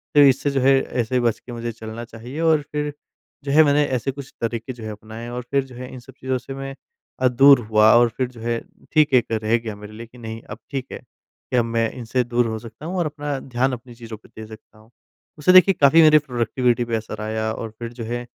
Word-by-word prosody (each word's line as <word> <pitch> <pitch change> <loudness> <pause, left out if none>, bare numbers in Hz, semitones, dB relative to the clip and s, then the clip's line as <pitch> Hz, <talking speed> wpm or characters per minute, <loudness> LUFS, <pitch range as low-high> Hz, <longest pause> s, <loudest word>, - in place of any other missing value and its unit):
तो - - +7
इससे 140 +1 +4
जो 140 - 0
है 135 +2 +5
ऐसे 120 0 -2
ही 125 - +3
बच 115 -3 0
के 125 - -12
मुझे 120 0 -4
चलना 115 +1 -8
चाहिए 120 +5 -9
और 160 -2 +3
फिर 150 0 -2 0.5
जो 140 - -3
है 155 +3 +7
मैंने 145 0 +3
ऐसे 130 0 -1
कुछ 135 0 -10
तरीके 115 +2 -3
जो 120 -2 -11
है 110 - -5
अपनाएँ। 110 +3 -9
और 125 +1 -4
फिर 140 -1 +2
जो 130 -2 -14
है 125 +1 -8
इन 130 - -8
सब 130 +2 -15
चीज़ों 130 0 -1
से 125 +2 -8
मैं 135 0 -6 0.4
अ, 130 - +4
दूर 135 +2 +7
हुआ। 110 0 +6
और 120 0 +5
फिर 130 - 0
जो 125 -2 -15
है 115 0 -1 0.3
ठीक 155 -3 +3
है 130 - +8
एक 115 - -9
रह 110 +2 +3
गया 115 -2 -6
मेरे 105 +1 -11
लिए 115 +2 -9
कि 120 - -18
नहीं 115 -1 -7
अब 105 - -7
ठीक 135 -2 -3
है - - -6
कि 125 - -8
अब 120 - +3
मैं 115 -1 0
इनसे 125 +1 -1
दूर 120 0 0
हो 110 -1 -3
सकता 115 +6 -11
हूँ 180 +3 -4
और 175 - +1
अपना 145 -2 -3
ध्यान 130 0 -1
अपनी 120 0 -9
चीज़ों 115 -2 -9
पे 105 - -21
दे - - -7
सकता 110 0 -15
हूँ। 110 +1 -21 0.5
उससे 150 +5 +4
देखिए 185 +1 +8
काफ़ी 150 +4 +7
मेरी 155 -1 +7
प्रोडक्टिविटी 120 -2 0
पे 115 -1 -2
असर 110 -1 -5
आया 110 0 -2
और 115 0 -6
फिर 120 0 -6
जो 120 -1 -7
है 120 +2 -4
120 Hz, 260 wpm, -22 LUFS, 115-135 Hz, 0.5 s, है